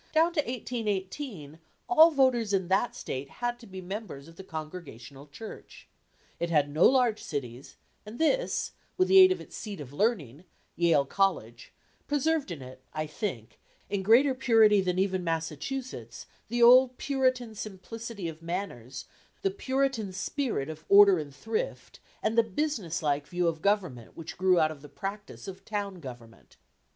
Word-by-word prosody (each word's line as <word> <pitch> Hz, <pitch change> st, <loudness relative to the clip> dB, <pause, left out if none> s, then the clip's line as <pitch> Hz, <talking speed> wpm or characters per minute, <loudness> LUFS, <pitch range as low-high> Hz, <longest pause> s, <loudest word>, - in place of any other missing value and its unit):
Down 325 Hz, +2 st, +4 dB
to 330 Hz, -, 0 dB
1818 210 Hz, -, -4 dB, 0.3 s
all 330 Hz, -2 st, +7 dB
voters 255 Hz, -8 st, +2 dB
in 185 Hz, -2 st, 0 dB
that 195 Hz, +6 st, +1 dB
State 135 Hz, +1 st, -5 dB
had 240 Hz, -, -3 dB
to 235 Hz, -, -13 dB
be 190 Hz, -1 st, -8 dB
members 185 Hz, -6 st, -7 dB
of 165 Hz, -, -15 dB
the 190 Hz, -, -10 dB
Congregational 150 Hz, -6 st, -8 dB
Church. 215 Hz, +10 st, -11 dB, 0.5 s
It 170 Hz, -, -1 dB
had 145 Hz, -3 st, +2 dB
no 155 Hz, +4 st, +4 dB
large 245 Hz, -4 st, +2 dB
cities, 130 Hz, -4 st, -6 dB, 0.3 s
and 215 Hz, +3 st, -10 dB
this, -, -, +1 dB, 0.3 s
with 370 Hz, 0 st, +2 dB
the 385 Hz, -, +8 dB
aid 375 Hz, 0 st, +9 dB
of 370 Hz, -, 0 dB
its -, -, -11 dB
seat 205 Hz, -5 st, -6 dB
of 140 Hz, -2 st, -9 dB
learning, 165 Hz, -, -1 dB, 0.3 s
Yale 165 Hz, -4 st, +3 dB
College, 195 Hz, +7 st, -1 dB, 0.4 s
preserved 295 Hz, -1 st, 0 dB
in 160 Hz, -6 st, -6 dB
it, 130 Hz, 0 st, -12 dB
I 155 Hz, 0 st, -1 dB
think, 150 Hz, -, -5 dB, 0.3 s
in 200 Hz, -1 st, 0 dB
greater 240 Hz, +8 st, +5 dB
purity 220 Hz, -5 st, +5 dB
than 180 Hz, -1 st, -1 dB
even 190 Hz, -1 st, 0 dB
Massachusetts, 165 Hz, -, -4 dB, 0.2 s
the 240 Hz, 0 st, +1 dB
old 250 Hz, +1 st, +7 dB
Puritan 255 Hz, -4 st, 0 dB
simplicity 215 Hz, 0 st, -7 dB
of 160 Hz, 0 st, -8 dB
manners, 165 Hz, -, -5 dB, 0.4 s
the 390 Hz, -, +2 dB
Puritan 265 Hz, -, -1 dB
spirit 195 Hz, -, -2 dB
of 155 Hz, 0 st, -8 dB
order 200 Hz, -2 st, +8 dB
and 145 Hz, -2 st, -6 dB
thrift, 225 Hz, -, -4 dB, 0.2 s
and 220 Hz, -, +1 dB
the 230 Hz, -, +7 dB
business 225 Hz, -, -2 dB
like 145 Hz, -1 st, 0 dB
view 175 Hz, 0 st, 0 dB
of 160 Hz, -1 st, -1 dB
government 180 Hz, -, -1 dB
which 160 Hz, -1 st, -7 dB
grew 185 Hz, -1 st, +3 dB
out 155 Hz, -1 st, +3 dB
of 150 Hz, -3 st, -10 dB
the 145 Hz, -, -12 dB
practice 205 Hz, +3 st, -7 dB
of 190 Hz, 0 st, -8 dB
town 200 Hz, -3 st, -4 dB
government. 120 Hz, -6 st, -12 dB
195 Hz, 165 wpm, -28 LUFS, 155-240 Hz, 0.5 s, aid